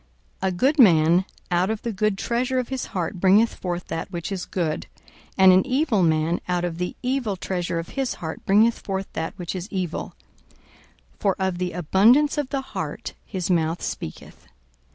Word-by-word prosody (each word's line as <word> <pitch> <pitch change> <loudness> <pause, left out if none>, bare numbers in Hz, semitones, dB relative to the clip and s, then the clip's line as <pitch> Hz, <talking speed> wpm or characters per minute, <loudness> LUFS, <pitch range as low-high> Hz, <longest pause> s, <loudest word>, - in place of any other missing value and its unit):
42:006:045 190 - +1
A 185 - -4
good 280 - +2
man 175 -4 +6 0.3
out 180 +2 +2
of 220 -1 -3
the 235 - -2
good 215 -1 0
treasure 250 +5 -1
of 250 -2 -1
his 265 -2 -3
heart 180 -1 -3
bringeth 200 +5 +4
forth 175 -1 -4
that 165 +3 -4
which 170 +1 -5
is 190 -2 -3
good; 165 -4 -2 0.5
and 190 -1 +8
an 185 - +5
evil 260 -5 +1
man 160 0 +2
out 175 0 +1
of 170 -1 -4
the 180 - -3
evil 250 -5 0
treasure 180 -2 -3
of 165 0 -4
his 270 -2 -2
heart 160 -1 -6
bringeth 220 +4 +4
forth 195 -1 -3
that 160 - -4
which 175 -2 -4
is 185 +3 -5
evil: 185 -4 -3 1.0
for 195 -2 +1
of 190 -2 -1
the 180 -1 -2
abundance 225 - +4
of 285 -3 -2
the 275 -1 -1
heart - - -4
his 185 -2 -2
mouth 165 -1 0
speaketh. 80 - -7
190 Hz, 185 wpm, -24 LUFS, 175-225 Hz, 1.0 s, and